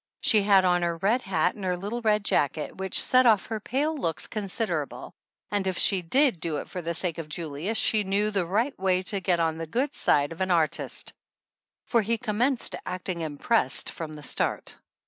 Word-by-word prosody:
She 215 -3 +4
had 195 -2 +4
on 180 -1 +3
her 170 -1 -1
red 210 +8 +1
hat 180 -5 0
and 205 - -10
her 180 -1 -1
little 210 +6 -4
red 210 -2 +1
jacket, 150 +2 0
which 190 -1 -1
set 255 0 +4
off 215 -4 +4
her 220 -1 -4
pale 285 +9 -1
looks 165 - -2
considerable, 195 - -4 0.4
and 200 -2 -1
if 185 -2 -1
she 195 -3 +2
did 250 - +2
do 155 -2 -2
it - - -6
for 180 - -6
the 170 0 -3
sake 170 -1 -2
of 155 -2 -7
Julius 165 +6 -3
she 215 -1 +3
knew 205 +2 0
the 195 -4 -1
right 225 +10 0
way 185 -1 +1
to 195 +2 -2
get 180 -2 +1
on 160 -1 0
the 165 - -5
good 260 - -1
side 145 +1 +2
of 165 - -8
an 190 - 0
artist, 165 -3 0 0.7
for 235 - +2
he 230 +2 -1
commenced 240 +3 +1
acting 185 -1 -4
impressed 155 - +2
from 160 -2 -7
the 150 -1 -10
start. - - -1
190 Hz, 205 wpm, -26 LUFS, 165-215 Hz, 0.7 s, She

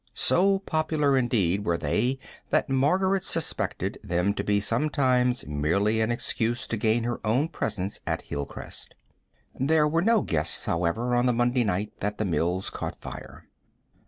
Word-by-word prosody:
So 195 +2 +4
popular, 155 -6 +1
indeed, 105 -7 +1
were 85 -4 +1
they 110 - 0 0.3
that - - +1
Margaret 185 +9 +2
suspected 110 - -2
them 90 0 0
to - - -3
be 105 0 +2
sometimes 125 +1 +1
merely 90 +10 +1
an 110 +1 +1
excuse 120 0 -1
to - - -1
gain 110 +2 +1
her 120 +1 -3
own 125 +9 +1
presence 100 - -3
at - - -1
Hilcrest. 70 -1 -6 0.6
There 150 +3 +3
were 165 +2 +1
no 225 +1 +3
guests, 75 -2 -1
however, 90 +9 0
on 120 +1 +3
the 125 - +3
Monday 120 +1 +2
night 100 0 -1
that 105 +1 -2
the 110 - -1
mills 90 +1 0
caught - - -5
fire. - - -9
120 Hz, 155 wpm, -26 LUFS, 100-140 Hz, 0.6 s, So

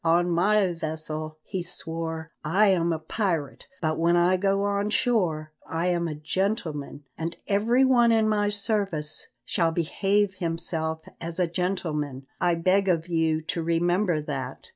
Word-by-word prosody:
"On 175 +1 +3
my 195 +2 +3
vessel," 155 -1 -4
he 190 -2 -4
swore, 165 -2 -5
"I 195 +7 +4
am 170 -3 +2
a 165 - 0
pirate, 160 -2 -2 0.2
but 155 0 0
when 170 +1 +3
I 175 +2 +4
go 195 +1 +1
on 200 0 0
shore 180 -10 +1 0.2
I 165 +2 -1
am 170 -1 0
a 155 - -4
gentleman, 155 -3 -2 0.2
and 165 +1 -3
every 230 +6 +3
one 240 -3 +5
in 220 -1 +3
my 205 -1 +2
service 200 -7 -2 0.2
shall 170 -2 +1
behave 195 +5 +1
himself 160 -1 -1 0.2
as 165 +1 -5
a 180 - +4
gentleman. 165 -6 -2
I 175 -1 +2
beg 185 +3 +2
of 170 -1 +1
you 160 -2 +1
to 165 +2 -2
remember 170 0 +1
that." 135 -3 -5
170 Hz, 155 wpm, -26 LUFS, 160-195 Hz, 0.2 s, one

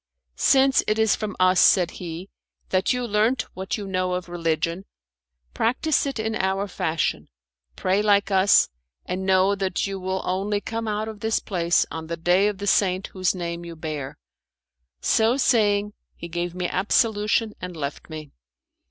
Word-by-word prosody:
"Since 270 0 +5
it 215 - +1
is 220 -2 +3
from 215 -2 -5
us," 185 0 +4
said 180 -3 +5
he, 175 +2 -8 0.4
"that 185 0 +1
you 250 -1 -1
learnt 220 +3 +1
what 190 +4 -4
you 205 - -6
know 185 -1 -1
of 180 -1 -4
religion, 165 +1 -2 0.7
practise 275 +6 +1
it 275 - -4
in 220 0 -2
our 195 +1 -1
fashion, 160 -3 -2 0.5
pray 190 +2 +1
like 205 -1 +2
us, 190 +1 +5 0.4
and 190 +1 -4
know 190 +1 +4
that 195 -2 -1
you 195 -1 -4
will 190 0 -3
only 200 +3 -1
come 225 +2 -4
out 215 +1 -2
of 220 -2 -8
this 220 +1 0
place 175 -3 +1
on 160 0 -6
the 170 +1 -4
day 180 +4 +3
of 210 -2 -2
the 200 - -5
saint 190 -1 +2
whose 185 0 0
name 170 -1 -4
you 170 -1 -8
bear." 155 -4 -5 0.8
So 225 +3 +2
saying 210 -5 +2 0.2
he 170 - -8
gave 175 +1 -4
me 180 -1 -2
absolution, 215 +2 +1
and 180 -2 -6
left 140 +2 -5
me. 155 -2 -8
190 Hz, 170 wpm, -24 LUFS, 175-210 Hz, 0.8 s, Since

